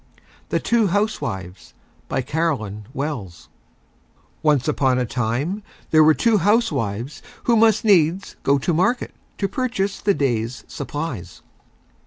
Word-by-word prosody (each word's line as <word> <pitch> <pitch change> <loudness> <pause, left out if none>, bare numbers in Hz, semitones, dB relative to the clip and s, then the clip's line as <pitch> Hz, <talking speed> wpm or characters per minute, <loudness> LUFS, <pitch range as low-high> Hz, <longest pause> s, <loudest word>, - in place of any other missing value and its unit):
THE - - +1
TWO 230 -3 +2
HOUSEWIVES 170 - -3 0.3
BY - - 0
CAROLYN 125 -9 -2
WELLS 135 - -5 0.9
Once 150 -4 +2
on 135 -4 +2
a 125 - +1
Time 130 - -2 0.3
there 155 -1 +7
were 155 0 +6
Two 230 -3 +3
Housewives 150 - 0 0.2
who 235 - +3
must 220 -1 +4
Needs 185 -1 +3
go 140 +1 +3
to 155 +6 0
Market 185 +10 +1 0.2
to 195 - 0
purchase 200 -5 -2
the 200 -1 +2
Day's 120 -3 -1
Supplies. 140 - -6
150 Hz, 125 wpm, -22 LUFS, 120-200 Hz, 0.9 s, there